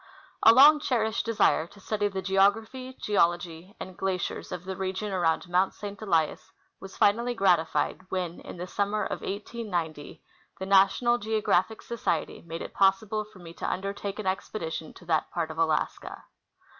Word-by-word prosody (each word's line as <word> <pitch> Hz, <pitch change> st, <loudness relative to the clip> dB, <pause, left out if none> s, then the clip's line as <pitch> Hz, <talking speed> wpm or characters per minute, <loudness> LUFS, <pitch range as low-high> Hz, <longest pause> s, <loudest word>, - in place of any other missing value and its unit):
A 225 Hz, -, +9 dB
long 290 Hz, +5 st, +8 dB
cherished 225 Hz, -5 st, 0 dB
desire 210 Hz, -7 st, +2 dB
to 200 Hz, -, -17 dB
study 205 Hz, +1 st, -1 dB
the 190 Hz, -1 st, -4 dB
geography, 220 Hz, +7 st, +1 dB
geology, 175 Hz, -1 st, 0 dB
and 185 Hz, -1 st, -8 dB
glaciers 190 Hz, -1 st, -3 dB
of 180 Hz, -, -6 dB
the 190 Hz, 0 st, -4 dB
region 190 Hz, +2 st, -3 dB
around 170 Hz, -1 st, +1 dB
Mount 180 Hz, +2 st, +1 dB
St. 205 Hz, -1 st, -8 dB
Elias 165 Hz, -7 st, 0 dB, 0.3 s
was 195 Hz, 0 st, -11 dB
finally 235 Hz, +4 st, +2 dB
gratified 185 Hz, -1 st, +1 dB
when, 180 Hz, -2 st, -3 dB
in -, -, -10 dB
the 175 Hz, -, -5 dB
summer 205 Hz, +3 st, -1 dB
of -, -, -4 dB
1890, 185 Hz, -8 st, -5 dB, 0.3 s
the 190 Hz, -, -5 dB
National 200 Hz, +5 st, +4 dB
Geographic 215 Hz, -1 st, 0 dB
Society 235 Hz, -2 st, -2 dB
made 165 Hz, 0 st, -6 dB
it -, -, -9 dB
possible 195 Hz, +2 st, +2 dB
for 210 Hz, -1 st, -18 dB
me 170 Hz, -2 st, -11 dB
to -, -, -3 dB
undertake 200 Hz, +1 st, -4 dB
an 215 Hz, -, -5 dB
expedition 180 Hz, -4 st, -3 dB
to 175 Hz, -, -15 dB
that 160 Hz, -2 st, 0 dB
part 165 Hz, -2 st, -3 dB
of 160 Hz, -, -8 dB
Alaska. 160 Hz, -2 st, -1 dB
195 Hz, 160 wpm, -27 LUFS, 175-215 Hz, 0.3 s, A